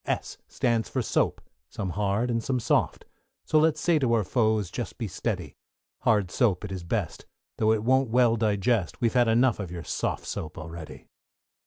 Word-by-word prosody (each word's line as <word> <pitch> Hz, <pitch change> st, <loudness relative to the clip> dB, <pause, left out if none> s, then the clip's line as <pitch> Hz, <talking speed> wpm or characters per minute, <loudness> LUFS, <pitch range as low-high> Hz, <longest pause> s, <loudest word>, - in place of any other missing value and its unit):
=S= -, -, -3 dB
stands 115 Hz, -4 st, 0 dB
for -, -, -1 dB
Soap, -, -, 0 dB, 0.3 s
some 100 Hz, -5 st, -4 dB
hard, 105 Hz, +5 st, 0 dB
and 115 Hz, -1 st, -1 dB
some 130 Hz, +1 st, 0 dB
soft, 115 Hz, -, 0 dB, 0.4 s
So 155 Hz, -, +3 dB
let's 155 Hz, 0 st, +3 dB
say 165 Hz, +1 st, +2 dB
to 125 Hz, -4 st, +1 dB
our 115 Hz, -2 st, +3 dB
foes, 110 Hz, -3 st, +1 dB
just -, -, -5 dB
be -, -, -3 dB
steady; -, -, -4 dB, 0.4 s
Hard 105 Hz, -5 st, +2 dB
soap 105 Hz, -6 st, +1 dB
it 100 Hz, -, -7 dB
is 95 Hz, -2 st, -5 dB
best, 85 Hz, -, -3 dB, 0.3 s
though 110 Hz, 0 st, +3 dB
it 110 Hz, -1 st, +1 dB
won't 130 Hz, +1 st, +3 dB
well 120 Hz, -1 st, +4 dB
digest, 105 Hz, -2 st, 0 dB
We've 115 Hz, -3 st, +1 dB
had 120 Hz, -2 st, +4 dB
enough 115 Hz, +1 st, +3 dB
of 95 Hz, -4 st, -4 dB
your 85 Hz, -1 st, -6 dB
soft -, -, -2 dB
soap 75 Hz, -, -5 dB
already. 80 Hz, 0 st, -9 dB
110 Hz, 185 wpm, -27 LUFS, 100-125 Hz, 0.4 s, well